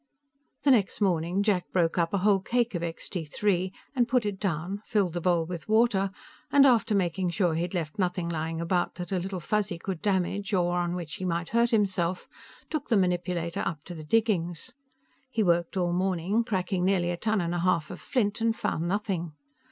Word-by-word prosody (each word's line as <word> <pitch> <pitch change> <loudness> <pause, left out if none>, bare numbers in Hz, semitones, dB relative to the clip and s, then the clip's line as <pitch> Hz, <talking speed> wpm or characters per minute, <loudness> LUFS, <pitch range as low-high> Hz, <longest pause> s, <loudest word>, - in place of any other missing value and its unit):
The 285 - +5
next 215 -7 +2
morning, 180 -1 +1
Jack 195 -4 0
broke 175 -1 +1
up 165 -1 +1
a 200 - +1
whole 205 -2 +5
cake 240 +3 0
of 175 - -2
Extee 170 +1 -4
Three 185 +3 0 0.2
and 245 -2 +3
put 245 -2 +2
it 200 -2 -3
down, 185 +2 -2
filled 200 -7 0
the 175 - -2
bowl 170 -2 +2
with 175 +2 -7
water, 215 -3 +3 0.4
and, 280 -1 +7
after 230 -5 +4
making 185 -1 0
sure 170 0 +1
he 165 - -1
had 175 +2 -3
left 160 0 -3
nothing 180 -2 0
lying 165 0 -2
around 175 +1 0
that 175 0 -6
Little 190 0 -2
Fuzzy 200 0 -1
could 180 0 -5
damage 195 +1 0
or 175 -1 +1
on 175 0 -1
which 165 -4 -5
he - - -6
might 170 -1 -1
hurt 235 +1 +3
himself, 190 -5 0 0.4
took 310 -3 -3
the 225 - +4
manipulator 175 -2 0
up 155 -4 -3
to 175 - -8
the 160 -2 -8
diggings. 185 +1 0 0.6
He 225 -4 0
worked 170 0 +1
all 175 -1 +1
morning, 185 +4 +1
cracking 185 -3 -1
nearly 180 -2 +2
a - - -1
ton 215 +2 0
and 170 -1 -1
a 175 - -1
half 170 -3 +1
of 180 - -7
flint, 215 -4 0
and 225 0 +2
found 165 -5 -2
nothing. 185 -4 -2
180 Hz, 200 wpm, -28 LUFS, 170-205 Hz, 0.6 s, and